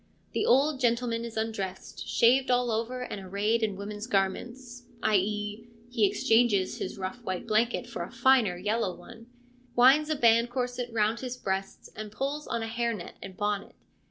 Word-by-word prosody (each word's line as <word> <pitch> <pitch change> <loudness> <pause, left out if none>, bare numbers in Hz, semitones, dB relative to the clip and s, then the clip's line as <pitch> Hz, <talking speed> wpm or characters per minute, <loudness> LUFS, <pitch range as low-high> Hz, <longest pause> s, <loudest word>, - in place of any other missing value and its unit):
The - - 0
old 275 +3 +4
gentleman 235 -1 +1
is 230 -1 -7
undressed, 205 -4 -4
shaved 255 +3 +4
all 245 -1 +2
over 230 +3 -2
and 205 -5 -6
arrayed 205 +5 0
in 215 -3 0
woman's 205 +2 -6
garments, 240 +4 -2 0.2
i.e., 210 +2 0 0.2
he 225 -4 +3
exchanges 225 -3 +2
his - - -4
rough 195 +6 -5
white 185 -4 -3
blanket 230 +2 +1
for 240 -1 -6
a - - -5
finer 235 -6 +3
yellow 205 0 -1
one; 230 0 -13 0.5
winds 270 +5 +6
a 310 - +1
band 235 -2 +4
corset 245 -1 -3
round 220 +1 +1
his 255 0 -5
breast 195 -3 -4
and 215 -1 -7
puts 280 +6 -3
on 235 -1 -2
a - - -3
hair 235 0 -1
net 175 - -9
and 190 -1 -9
bonnet. 205 -1 -2
230 Hz, 170 wpm, -28 LUFS, 205-245 Hz, 0.5 s, winds